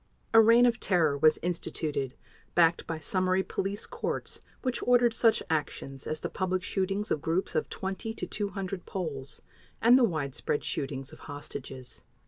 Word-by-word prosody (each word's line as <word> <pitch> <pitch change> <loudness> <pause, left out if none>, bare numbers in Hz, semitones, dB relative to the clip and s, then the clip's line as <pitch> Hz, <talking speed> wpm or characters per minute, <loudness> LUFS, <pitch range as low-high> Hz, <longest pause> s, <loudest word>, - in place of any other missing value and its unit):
A 225 - +9
reign 230 +2 +7
of 240 -1 +2
terror 165 -9 +3
was 155 +2 +5
instituted, 150 -6 -2 0.4
backed 170 -1 +4
by 165 - -2
summary 185 +3 +1
police 200 +2 -3
courts - - -3 0.2
which 255 -2 -1
ordered 245 -1 +4
such 225 -1 +3
actions 140 -3 -3
as 155 0 -3
the - - -1
public 185 -1 -1
shootings 195 +1 -1
of 150 - +1
groups 165 +4 -1
of - - 0
20 190 +3 -4
to - - -3
200 195 -3 -4
Poles, 145 -8 -4 0.4
and 240 +3 +7
the - - +4
widespread 150 - -1
shootings 135 -1 -3
of - - -12
hostages. 135 -3 -7
180 Hz, 155 wpm, -29 LUFS, 145-205 Hz, 0.4 s, A